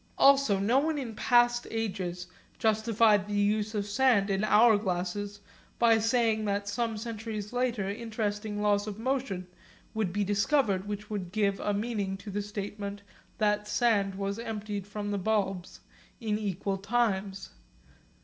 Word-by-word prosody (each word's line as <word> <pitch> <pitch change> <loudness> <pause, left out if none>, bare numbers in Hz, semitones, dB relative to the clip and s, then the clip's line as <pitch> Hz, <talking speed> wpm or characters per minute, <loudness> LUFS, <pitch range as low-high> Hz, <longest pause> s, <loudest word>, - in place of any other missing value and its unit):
Also 275 -7 +5
no 220 +7 +3
one 310 +1 0
in 240 -6 -5
past 240 +1 +3
ages 185 -5 -3 0.3
justified 220 -2 +3
the 205 - -3
use 210 +1 +1
of 205 -1 -1
sand 205 -2 +3
in 195 +1 0
hour 220 +1 +6
glasses 200 +1 -3 0.4
by 230 -1 +5
saying 225 -1 +2
that 200 0 -1
some 225 +1 -1
centuries 220 -1 -5
later 245 -5 0
interesting 210 -1 -3
laws 205 0 +2
of 210 -1 -5
motion 230 -6 -2 0.5
would 215 -5 -1
be 205 +2 0
discovered 205 -1 +1
which 210 +1 -5
would 190 -4 -4
give 200 -1 +1
a 205 - -1
meaning 205 -2 -2
to 200 +1 -9
the 205 +2 -2
statement 205 0 -6 0.3
that 210 -1 +1
the - - -11
sand 205 -5 +2
was 200 +2 -3
emptied 210 -3 -4
from 205 0 -4
the 200 - -1
bulbs 195 -3 -1 0.4
in 215 -3 -1
equal 195 -1 -2
times. 200 -2 -1
210 Hz, 150 wpm, -29 LUFS, 200-225 Hz, 0.5 s, hour